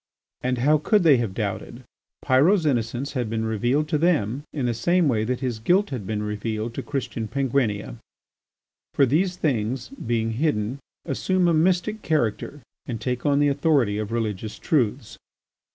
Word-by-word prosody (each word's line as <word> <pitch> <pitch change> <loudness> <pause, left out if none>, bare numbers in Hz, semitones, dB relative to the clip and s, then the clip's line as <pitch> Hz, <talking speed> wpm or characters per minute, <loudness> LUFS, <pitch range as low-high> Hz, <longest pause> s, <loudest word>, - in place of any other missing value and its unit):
And 125 0 -1
how 150 +5 +3
could 205 +6 +2
they 150 -5 +6
have 115 -6 -2
doubted? 110 +4 -4 0.4
Pyrot's 155 +7 +4
innocence 125 0 -1
had 125 -5 -2
been 110 0 -2
revealed 120 +7 0
to 150 - +1
them 145 - +1
in 140 -4 -2
the 120 - +1
same 170 +9 +2
way 110 -5 +1
that 125 +2 -2
his 125 -4 -2
guilt 180 - +2
had 115 -8 -5
been 105 -1 -2
revealed 110 +2 -3
to - - -4
Christian 125 -5 -4
Penguinia's; 120 - -1 1.0
for 140 - +5
these 175 +8 +1
things, 125 -5 -1
being 115 -4 -2
hidden, 120 -1 -1 0.3
assume 180 +5 +1
a 170 - +3
mystic 180 +6 +1
character 145 - -1 0.3
and 115 -3 -4
take 125 +4 -2
on 140 -1 +3
the 145 0 +4
authority 140 -7 +2
of 110 0 -4
religious 110 -2 -3
truths. 115 -6 -1
125 Hz, 165 wpm, -24 LUFS, 110-150 Hz, 1.0 s, they